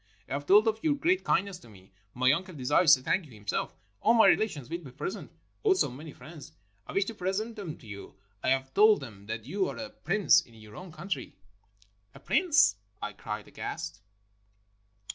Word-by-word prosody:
"I - - -5
have 145 +1 -4
told 210 +3 +6
of 220 0 +1
your 300 -2 +2
great 360 +6 +1
kind 195 - +2
ness 195 -3 -8
to 120 - -16
me. 95 -2 -17 0.2
My 130 +1 +4
uncle 180 +4 -2
desires 150 +4 +5
to 130 - -11
thank 185 +5 0
you 130 - -16
himself. 105 -2 -3 0.3
AU 230 - +4
my 225 -1 +6
relations 155 - +2
will 170 +4 -4
be 155 -6 -11
present, 135 - -6 0.3
also 380 - +2
many 150 +5 -9
friends. 150 +4 -12 0.3
I - - -7
\vish 195 0 +2
to 230 - -5
present 205 +4 -3
them 190 -8 -6
to - - -18
you. 100 -2 -10 0.3
I - - 0
have 135 0 0
told 215 -4 +6
them 100 -6 -11
that 110 0 -5
you 190 +8 -1
are - - -7
a 275 -1 -6
prince 195 - +3
in 115 - -19
your 110 -1 -14
own 180 -1 -9
country." 180 +5 -5 0.8
"A - - -11
prince!" 310 - +3 0.2
I - - -5
cried - - -6
aghast. 85 +5 -6
165 Hz, 200 wpm, -29 LUFS, 125-210 Hz, 0.8 s, told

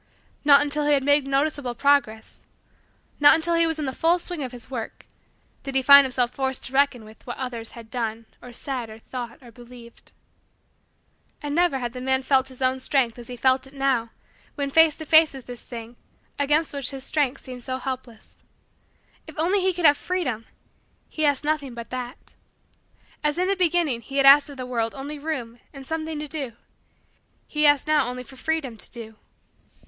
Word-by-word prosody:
Not 285 -1 +7
until 295 0 -1
he 295 - +4
had 275 -2 +2
made 285 0 +3
noticeable 275 -2 -1
progress 275 -6 +1 0.8
not 290 +2 +8
until 330 +1 -1
he 335 0 +3
was 325 -1 -2
in 305 - -3
the 265 - -3
full 330 +5 +2
swing 350 -2 -5
of 260 -3 -4
his 245 -2 -9
work 235 -4 -6 0.6
did 275 -1 -6
he 265 - +3
find 280 +1 +9
himself 250 -2 0
forced 265 0 -2
to 260 - -8
reckon 270 -4 +2
with 215 +3 -17
what 240 - -5
others 240 -3 -5
had 230 -2 -12
done 225 -2 -3 0.2
or 245 - -11
said 245 -1 -5
or 220 - -10
thought 235 +1 -7
or 240 - -13
believed. 240 0 -15 1.3
And 290 -2 -4
never 345 -3 +2
had 240 -2 -4
the 250 - -7
man 265 +1 0
felt 265 -1 +2
his 260 0 -7
own 260 0 +1
strength 255 -3 +1
as 235 - -9
he 250 - -6
felt 260 +2 +2
it 270 - -17
now 265 -4 0 0.5
when 280 -1 -3
face 320 0 +5
to 315 - -7
face 315 -2 +6
with 265 - -10
this 245 -1 -8
thing 235 0 -9 0.4
against 295 +3 +2
which 275 -3 -2
his 270 -2 -7
strength 275 -3 -1
seemed 250 -2 -7
so 260 0 -3
helpless. 255 -4 -7 0.9
If 315 - -11
only 365 +6 +1
he 375 0 +2
could 350 -2 -2
have 290 -1 +7
freedom! 275 -12 -3 0.6
He 310 - -1
asked 285 -1 +1
nothing 295 -4 -2
but 235 -1 -8
that. 250 +1 -7 0.9
As 300 +1 +1
in 365 +1 +1
the 395 - +1
beginning 340 -9 +1
he 270 +5 -7
had 275 - +4
asked 280 +1 +8
of 285 - -10
the 255 - -5
world 230 -2 -2
only 285 +2 -6
room 250 -6 -5
and 275 -1 -11
something 320 +1 -4
to 300 0 -5
do, 280 -6 -4 0.9
he 300 0 +2
asked 290 0 +3
now 305 -4 +3
only 250 0 -5
for 265 - -14
freedom 285 -5 -3
to - - -6
do. 225 -2 -8
270 Hz, 200 wpm, -24 LUFS, 245-295 Hz, 1.3 s, find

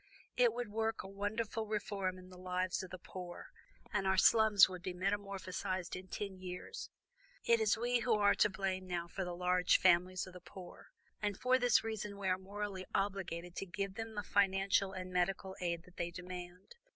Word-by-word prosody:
It 245 -2 +5
would 240 -2 -4
work 225 +1 -1
a - - -7
wonderful 215 +3 -2
reform 200 -3 -2
in 185 0 -12
the 180 - -11
lives 185 0 -1
of 185 - -8
the 185 - -7
poor, 180 -1 -8 0.4
and 195 - +1
our 190 0 +3
slums 220 -1 +7
would 185 -1 -7
be 185 0 -4
metamorphosed 190 -1 -2
in 185 +1 -8
ten 190 0 -5
years. 185 - -6 0.5
It 235 0 +4
is 220 0 +3
we 240 +1 +2
who 235 -1 +2
are 205 -1 +5
to - - +4
blame 190 -1 -2
now 175 -1 -2
for 190 +3 -4
the 180 -1 -4
large 180 0 +3
families 180 +2 +3
of 185 - -12
the 180 - -10
poor, 180 0 -11 0.3
and 205 -2 -1
for 255 +1 +4
this 245 -1 +4
reason 215 -2 -4
we 195 -1 -1
are 185 0 +2
morally 195 -1 -5
obligated 180 -3 -2
to 195 - -3
give 195 +1 -3
them 225 +1 -6
the 205 - -2
financial 195 0 +2
and 185 -1 -6
medical 190 +1 0
aid 170 -1 -1
that 180 0 -19
they 170 0 -1
demand. 180 - -8
190 Hz, 195 wpm, -35 LUFS, 180-205 Hz, 0.5 s, slums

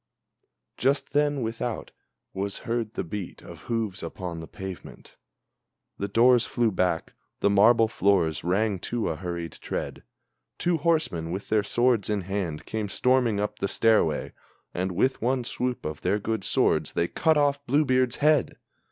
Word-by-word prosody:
Just 140 +2 0
then, 145 -2 +2
without, 115 +1 -4 0.4
was 100 +1 -2
heard 115 -2 -2
the - - -1
beat 95 +1 -6
of - - -11
hoofs 110 -5 -2
upon 90 -3 -5
the 80 - -8
pavement, 95 +3 -9 0.8
The 100 - -1
doors 120 +4 +5
flew 120 -2 +1
back, 90 -3 -1 0.3
the 100 - +3
marble 115 +3 +5
floors 95 -7 +1
rang 100 +3 +1
to 120 +5 -2
a 80 - -2
hurried 85 -1 -5
tread. - - -4 0.6
Two 175 -1 +1
horsemen, 155 - 0
with 95 +4 -5
their 110 -1 +3
swords 120 0 +1
in 105 -2 0
hand, 90 -4 -3
came 110 -2 -3
storming 125 -1 +2
up 105 0 -3
the - - 0
stairway, 110 -9 +2 0.4
And 90 +1 -2
with 130 +9 +1
one 125 +2 +1
swoop 125 0 -3
of 75 0 -4
their 95 +3 +1
good 110 0 -2
swords - - +1
they 85 - +1
cut 160 - +2
off 145 -1 +2
Blue 145 +4 +3
beard's 130 -2 +2
head! 150 -2 +2
110 Hz, 160 wpm, -26 LUFS, 95-125 Hz, 0.8 s, doors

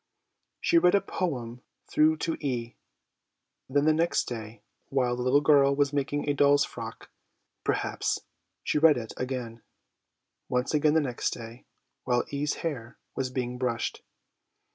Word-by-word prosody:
She 340 - +4
read 180 - +4
a 200 - +4
poem 125 -9 -3 0.2
through 155 +1 +3
to 165 - -1
E.; 120 -4 -2 0.9
then 145 +2 +2
the 155 - +5
next 165 +2 +1
day, 110 -2 -7 0.3
while 125 -3 +1
the 125 - -4
little 130 +3 +3
girl 140 -2 +5
was 140 0 +1
making 145 +1 -1
a 145 - +2
doll's 145 0 +4
frock, 115 -1 -9 0.5
perhaps, - - 0 0.5
she - - +1
read 155 -2 +6
it 115 -2 -6
again; 125 -3 -4 0.9
once 125 +3 0
again 150 0 +3
the 160 - +5
next 125 -4 -2
day, 115 +1 -10 0.4
while 125 -1 +1
E.'s 145 +1 -1
hair 125 -8 -4 0.2
was 130 -1 -1
being 125 -1 -3
brushed. 125 -3 -2
135 Hz, 145 wpm, -28 LUFS, 120-145 Hz, 0.9 s, read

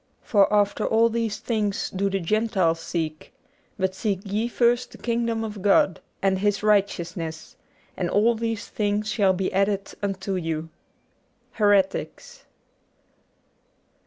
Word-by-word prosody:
For 200 -3 +3
after 205 -1 +2
all 230 +1 +3
these 230 -2 -2
things 210 -4 -2
do 195 +1 0
the 195 0 -1
Gentiles 190 -3 +1
seek. 160 -2 -4 0.5
But 190 -1 0
seek 195 -1 -2
ye 210 +4 -1
first 240 0 +1
the - - -11
Kingdom 230 -1 -1
of 210 -3 -6
God, 195 -3 +3 0.2
and 190 -1 +2
His 205 0 0
righteousness; 170 -6 -1 0.4
and 175 -2 -2
all 220 +3 +3
these 225 -1 -3
things 210 0 -1
shall 200 -4 +3
be 185 0 -2
added 195 0 0
unto 195 -1 -2
you.' 165 -2 -3 0.8
'Heretics.' 205 - 0
205 Hz, 130 wpm, -24 LUFS, 190-220 Hz, 0.8 s, For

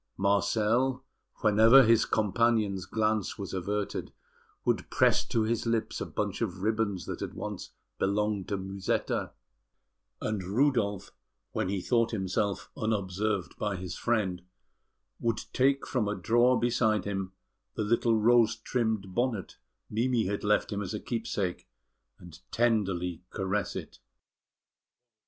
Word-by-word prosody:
Marcel, 110 +6 +1 0.4
whenever 110 +5 +7
his 115 -1 +4
companion's 105 -2 +1
glance 110 -2 0
was 100 -2 -6
averted, 100 +2 -3 0.5
would - - 0
press - - +3
to 115 - 0
his 115 +1 -1
lips 115 -1 -1
a - - -3
bunch - - -3
of 90 +1 -3
ribbons 110 -3 0
that - - -5
had - - -5
once - - -5 0.3
belonged 105 0 0
to 100 - -1
Musetta; 95 0 -2 0.9
and 105 -2 -2
Rudolf, 105 -2 +1 0.4
when - - -1
he 100 -1 -1
thought 115 +3 +2
himself 100 -1 -2
unobserved 105 -2 -1
by 105 -2 -1
his 90 -1 -5
friend, 100 -7 0 0.8
would 115 -2 0
take 135 +1 +2
from 120 -6 -1
a 105 - -1
drawer 120 +3 +3
beside 110 -4 +1
him 95 -2 -3 0.4
the - - -1
little 115 +1 +2
rose 115 0 +4
trimmed 110 -6 -2
bonnet 120 -3 -1 0.3
Mimi 115 +1 +1
had 100 +2 -2
left 105 +1 +2
him 100 - -2
as 100 +2 -4
a - - -3
keepsake, 105 -6 -3 0.5
and 85 -2 -13
tenderly 95 -8 0
caress 95 +2 -2
it. - - -7
105 Hz, 130 wpm, -29 LUFS, 95-115 Hz, 0.9 s, whenever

